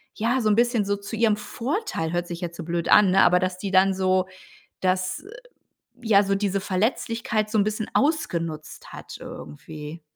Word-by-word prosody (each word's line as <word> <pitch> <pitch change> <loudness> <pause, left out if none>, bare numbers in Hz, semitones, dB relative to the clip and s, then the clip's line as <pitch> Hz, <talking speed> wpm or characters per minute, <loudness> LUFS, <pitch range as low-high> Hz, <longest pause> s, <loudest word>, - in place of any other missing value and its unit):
ja 240 +4 0
so 215 - +1
'n 205 - +4
bisschen 235 -2 +2
so 200 0 0
zu 200 +3 -7
ihrem 215 -2 +3
Vorteil, 245 - -3
hört 175 0 -1
sich 175 0 -7
jetzt 170 -1 -5
so 170 - -6
blöd 170 -1 -2
an, 200 -3 +6
ne, 195 - +5
aber 180 0 +5
dass 185 0 -2
die 200 0 -4
dann 190 +1 +4
so, 185 0 +1 0.5
das 185 - -1 0.8
ja 210 -3 +5
so 195 0 +1
diese 195 -1 -1
Verletzlichkeit 215 +2 -1
so 215 - +1
'n 200 - +4
bisschen 215 0 -3
ausgenutzt 165 - -2
hat - - -9
irgendwie. 150 - -9
195 Hz, 185 wpm, -24 LUFS, 180-220 Hz, 0.8 s, an